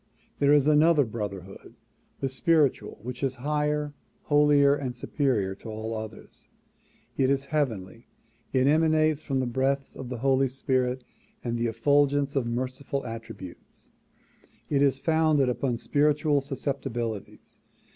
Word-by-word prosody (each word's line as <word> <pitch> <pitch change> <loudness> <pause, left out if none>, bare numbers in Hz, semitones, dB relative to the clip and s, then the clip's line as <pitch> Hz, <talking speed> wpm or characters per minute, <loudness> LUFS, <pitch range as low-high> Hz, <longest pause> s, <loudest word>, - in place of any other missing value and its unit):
There 140 0 +4
is 145 -2 +5
another 150 0 +5
brotherhood, 100 -4 -7 0.5
the 135 - +1
spiritual, 150 +1 +1
which 125 +1 -6
is 135 -2 -1
higher, 150 0 0 0.3
holier 145 -1 +4
and 135 -4 -3
superior 120 -7 0
to 105 +4 -11
all 110 +1 -4
others. 110 0 -9 0.7
It 130 -1 +3
is 140 0 +1
heavenly; 115 -7 -2 0.4
it 130 -1 +2
emanates 155 0 +3
from 135 -4 -2
the - - -1
breaths 135 +3 -1
of 130 -2 -7
the 125 - -4
Holy 135 +2 +2
Spirit 130 -1 -1 0.4
and 120 -1 -2
the 120 0 0
effulgence 140 +4 +2
of 130 -4 0
merciful 130 +3 -3
attributes; 115 -6 -10 0.8
it 140 -1 +2
is 140 -2 +3
founded 155 -4 +2
upon 120 0 -1
spiritual 145 +2 +2
susceptibilities. 130 -6 -5
135 Hz, 130 wpm, -27 LUFS, 120-145 Hz, 0.8 s, is